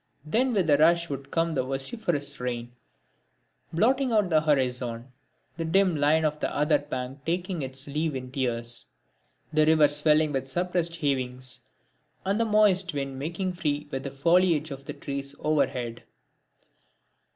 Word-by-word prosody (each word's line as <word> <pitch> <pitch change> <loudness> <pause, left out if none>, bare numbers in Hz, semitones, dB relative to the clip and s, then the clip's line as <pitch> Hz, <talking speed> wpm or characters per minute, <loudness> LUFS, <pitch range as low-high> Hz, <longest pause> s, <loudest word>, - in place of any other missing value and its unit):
Then 245 +12 +1
with 190 -6 +1
a 145 - +6
rush 170 +2 +4
would 135 0 -6
come 165 +1 0
the 135 - +1
vociferous 145 - -2
rain, 120 -1 -4 1.0
blotting 255 +9 +2
out 210 -5 +2
the 155 -1 +4
horizon; 125 -4 -1 0.5
the 165 - -2
dim 185 +2 +3
line 155 +2 +3
of 150 0 -1
the - - -1
other 150 0 +2
bank 135 -2 -6
taking 175 +1 -2
its 135 0 -3
leave 150 +1 -2
in 130 -1 -6
tears: 120 -3 -2 0.7
the 155 0 +4
river 155 -2 +6
swelling 150 +1 +3
with 135 -1 -2
suppressed 175 +2 0
heavings; 130 -4 -2 0.7
and 200 +3 +1
the 230 - +3
moist 195 -5 +3
wind 135 -1 -3
making 175 +6 -3
free 150 -4 -2
with 135 - -3
the 135 - -5
foliage 160 +2 +2
of 135 0 -8
the - - -5
trees 140 0 -5
overhead. 130 -6 -1
150 Hz, 150 wpm, -27 LUFS, 135-170 Hz, 1.0 s, a